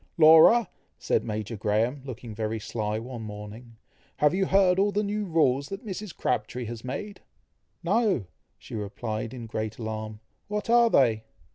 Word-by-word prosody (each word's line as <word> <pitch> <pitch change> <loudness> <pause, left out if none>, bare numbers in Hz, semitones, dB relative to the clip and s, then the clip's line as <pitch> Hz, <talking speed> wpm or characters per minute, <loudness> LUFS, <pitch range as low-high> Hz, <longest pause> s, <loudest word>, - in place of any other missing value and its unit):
"Laura!" 165 +8 +7 0.3
said - - 0
Major 110 0 -4
Graham, 110 +6 0
looking 120 -4 -8
very 110 +1 -3
sly 110 0 -3
one 120 +1 -7
morning, 110 +2 -9 0.4
"have 150 0 +3
you 190 0 +1
heard 190 -1 +4
all 205 +1 +3
the 205 +1 0
new 210 +1 -2
rules 140 -6 +2
that 195 +4 -7
Mrs. 205 -2 -6
Crabtree 125 +1 -2
has 115 0 -7
made?" 140 +11 -6 0.6
"No!" 205 - +1 0.5
replied 110 +1 -4
she - - -7
in 120 - -7
great 110 -1 -4
alarm; 110 -1 -5 0.3
"what 210 +2 -2
are 235 -1 +6
they?" 115 - +3
125 Hz, 155 wpm, -27 LUFS, -, 0.6 s, Laura